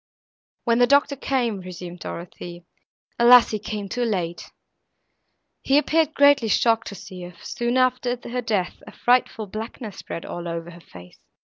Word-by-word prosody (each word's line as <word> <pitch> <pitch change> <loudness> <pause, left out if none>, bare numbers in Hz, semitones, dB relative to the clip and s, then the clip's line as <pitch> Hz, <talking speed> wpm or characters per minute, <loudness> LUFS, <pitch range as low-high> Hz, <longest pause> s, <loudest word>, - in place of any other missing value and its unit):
"When 235 -1 +2
the 245 - +5
doctor 285 +1 +3
came," 245 -6 -1
resumed 180 -1 -8
Dorothée, 175 0 -8 0.5
"alas! 240 0 +7
he 215 - -2
came 210 -1 -5
too 245 +5 -2
late; 180 -7 -2 1.1
he 275 - +3
appeared 310 +1 +2
greatly 285 -4 +5
shocked 225 +2 +2
to 200 - -7
see 190 -1 -10
her, 175 0 -9
for - - -17
soon 240 +1 -1
after 255 -1 +1
her 250 +1 -2
death 210 -6 -2
a - - -9
frightful 245 -3 +1
blackness 215 +1 -7
spread 165 - -7
all 175 0 -6
over 170 0 -5
her 170 0 -13
face. 90 - -15
225 Hz, 160 wpm, -23 LUFS, 180-250 Hz, 1.1 s, alas